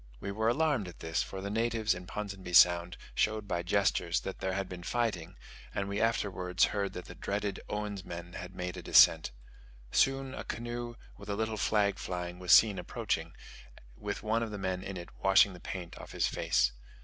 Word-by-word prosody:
We 100 - -4
were 110 +2 0
alarmed 140 - +2
at 90 - -10
this, 80 0 -1
for 95 - -5
the 100 +1 -4
natives 115 0 +1
in 90 0 -8
Ponsonby 100 -3 -6
Sound 85 0 +6 0.2
showed 110 -1 0
by 85 -3 -1
gestures, 85 -1 +1
that 95 - -6
there 95 -1 -1
had 95 0 -2
been 90 -1 -8
fighting; 105 -4 -2 0.4
and 100 - -1
we 100 +1 -2
afterwards 95 -5 +1
heard 100 -1 -1
that 90 - -7
the - - -9
dreaded 100 +1 -3
Oens 105 -2 -3
men 85 0 -8
had 90 0 -8
made 90 -1 -4
a - - -5
descent. - - +6 0.6
Soon 135 0 +2
a - - -5
canoe, 120 +1 -5 0.2
with - - -11
a 100 - 0
little 110 +1 -1
flag 100 -1 +1
flying, 90 -1 -4
was 90 -1 -1
seen 105 -4 +7
approaching, - - -2 0.6
with - - -5
one 110 +2 +1
of 115 - -2
the 105 - -5
men 95 -1 -2
in 95 0 -6
it 85 - -8
washing 95 0 +5
the 90 - -11
paint 90 -1 -6
off - - -10
his - - +1
face. - - +2
100 Hz, 195 wpm, -31 LUFS, 90-110 Hz, 0.6 s, seen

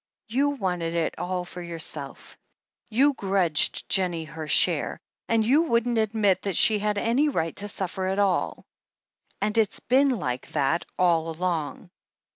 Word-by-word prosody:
You 275 +6 +2
wanted 180 -10 -2
it 165 -1 -1
all 180 +1 -2
for 180 0 -8
yourself 160 -4 -7 0.3
— - - -50
^you 275 +5 +3
grudged 190 -7 +1
Jennie 175 -4 0
her 155 0 -7
share, - - +2 0.3
and 225 -1 +2
you 275 +7 +4
wouldn't 235 -6 +1
admit 215 -3 +1
that 195 -4 -2
she 215 -2 +4
had 210 0 -1
any 240 +8 +2
right 165 - -2
to 205 - -1
suffer 190 -1 -3
at 190 +1 -1
all. 200 -3 0 0.8
"And 210 +2 0
it's 215 -2 +1
been 275 +3 +3
like 130 - -2
that 150 +3 +1
all 165 -3 +2
along. 170 +1 -3
190 Hz, 155 wpm, -25 LUFS, 170-225 Hz, 0.8 s, you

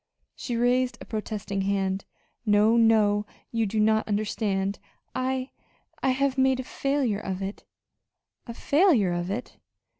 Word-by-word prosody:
She 240 - -4
raised 245 +1 +2
a - - -9
protesting 210 -2 -3
hand. 195 -1 -1 0.4
"No, 210 +1 +4
no, 215 -3 +4 0.2
you 225 -2 0
do 215 +2 -1
not 220 +1 +3
understand. 205 -2 -1 0.3
I 255 0 -2 0.5
I - - +2
have 270 +1 +1
made 265 0 +3
a - - -2
failure 270 -5 -1
of 190 -2 -4
it." 195 +2 -6 0.8
"A 235 - -5
failure 280 - +3
of 175 +1 -2
it!" 225 +6 -5
220 Hz, 140 wpm, -26 LUFS, 200-255 Hz, 0.8 s, No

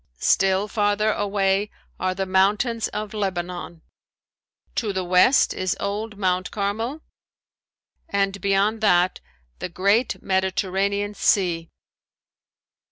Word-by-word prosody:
Still 195 - +2
farther 210 0 +1
away 200 0 0 0.3
are 185 0 -1
the 195 0 -2
mountains 205 +5 +2
of 210 +1 -5
Lebanon. 180 -4 -4 0.9
To 220 -4 -1
the 190 -1 -2
west 180 +9 +4
is 185 -1 -2
old 210 +2 -3
Mount 185 -2 0
Carmel 225 +9 -3 1.1
and 200 0 0
beyond 200 +3 +1
that 180 -3 +3 0.4
the - - -4
great 200 +7 +1
Mediterranean 195 +2 0
Sea. 175 -5 +1
200 Hz, 100 wpm, -23 LUFS, 185-210 Hz, 1.1 s, west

